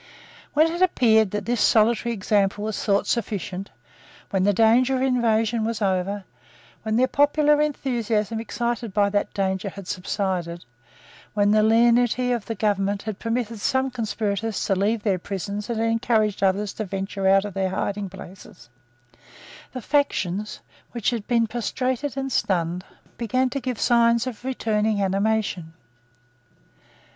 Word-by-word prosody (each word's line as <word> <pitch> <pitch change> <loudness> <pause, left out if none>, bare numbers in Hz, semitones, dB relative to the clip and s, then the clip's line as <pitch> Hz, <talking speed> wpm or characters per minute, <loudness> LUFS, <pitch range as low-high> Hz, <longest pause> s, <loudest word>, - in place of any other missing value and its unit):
When 310 +2 +6
it 345 - -4
appeared 220 - +4
that 210 0 -4
this 240 -2 0
solitary 230 +2 +3
example 205 -1 0
was 215 -1 -3
thought 200 -1 +2
sufficient, 200 -4 -3 0.6
when 190 -2 +1
the 205 - +4
danger 230 +5 +4
of 260 - 0
invasion 230 -3 +1
was 225 -1 -2
over, 195 0 -1 0.6
when 220 0 -2
the 255 +3 +3
popular 295 +1 +3
enthusiasm 235 -7 -1
excited 235 -2 -3
by 200 -1 +3
that 205 0 0
danger 190 0 -1
had 195 -1 -10
subsided, 180 -2 -3 0.7
when 205 0 +3
the 215 0 +4
lenity 240 +2 +3
of 235 -4 -2
the 225 - -3
government 200 -1 0
had 215 -2 -5
permitted 230 -1 -2
some 265 +3 +1
conspirators 220 -2 -2
to - - +1
leave 205 +3 0
their 195 -4 +1
prisons 200 +3 -5
and 230 -2 -2
had 225 - +1
encouraged 225 -2 +1
others 195 +1 +1
to 215 - -4
venture 195 0 -3
out 195 +1 +4
of 205 - -6
their 190 -1 -1
hidingplaces, 190 - -6 1.0
the 255 -3 -7
faction 210 -9 0 0.5
which 235 -2 0
had 230 -4 -4
been 235 -2 +3
prostrated 255 +4 -2
and 270 0 -3
stunned 180 -4 0 0.4
began 255 +3 0
to 275 - -2
give 250 -3 -3
signs 235 -1 +3
of 250 -3 -6
returning 220 -5 0
animation. 195 -3 -1
215 Hz, 145 wpm, -24 LUFS, 200-235 Hz, 1.0 s, When